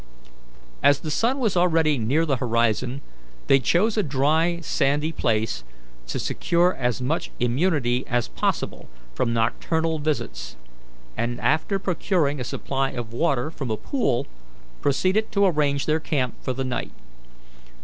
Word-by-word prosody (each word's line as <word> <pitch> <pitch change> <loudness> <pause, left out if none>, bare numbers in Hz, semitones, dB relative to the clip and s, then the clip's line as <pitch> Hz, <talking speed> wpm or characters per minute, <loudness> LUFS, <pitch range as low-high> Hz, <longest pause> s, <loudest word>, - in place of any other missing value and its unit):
As 145 0 +4
the 155 - -4
sun 235 - +1
was 225 -8 0
already 165 -5 +3
near 135 +9 +1
the 140 -4 +1
horizon, 120 +2 0 0.4
they 135 - +5
chose 200 - +2
a - - +4
dry, 160 +3 +1
sandy 145 +2 +1
place, 110 - 0 0.4
to - - -3
secure 175 +2 +1
as 125 0 -1
much 155 +6 -1
immunity 125 -1 +1
as 120 -2 0
possible - - -2 0.2
from 115 - 0
nocturnal 160 +8 0
visits, 115 - -3 0.6
and, 120 +1 -2
after 160 +6 +1
procuring 170 -5 0
a - - -2
supply 135 +2 -2
of 120 -3 -6
water 140 0 0
from 135 -6 -5
a 110 - -1
pool, 135 - 0 0.6
proceeded 185 +10 +1
to 200 -1 +4
arrange 145 -5 +1
their 155 +1 +2
camp 135 -5 -1
for 130 - -2
the 135 +1 -3
night. 130 - -3
140 Hz, 140 wpm, -24 LUFS, 120-165 Hz, 0.6 s, they